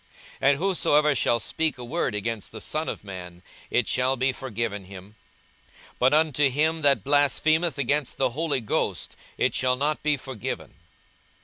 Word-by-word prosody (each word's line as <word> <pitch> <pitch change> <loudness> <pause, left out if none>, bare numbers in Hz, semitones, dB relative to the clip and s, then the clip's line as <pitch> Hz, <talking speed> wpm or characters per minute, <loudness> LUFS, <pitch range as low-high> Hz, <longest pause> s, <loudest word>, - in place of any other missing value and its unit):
42:012:010 135 - +5
And 140 - +3
whosoever 150 -4 +3
shall 120 -3 +2
speak 160 +5 -1
a 125 - -7
word 140 -4 -1
against 110 0 -4
the 110 - -8
Son 155 +8 -3
of - - -6
man, 90 -3 -9 0.3
it 120 -5 +1
shall 125 +6 +1
be 130 +2 +2
forgiven 115 -6 -4
him: 95 +2 -12 0.9
but 130 +1 +4
unto 150 -2 +3
him 155 +4 +1
that 140 -8 +3
blasphemeth 145 +3 +2
against 140 +1 -1
the 130 -2 +1
Holy 145 -1 -1
Ghost 110 - -1 0.2
it - - +1
shall 125 0 +1
not 150 +4 -1
be 150 -1 +1
forgiven. 130 -5 -6
135 Hz, 165 wpm, -25 LUFS, 115-150 Hz, 0.9 s, 42:012:010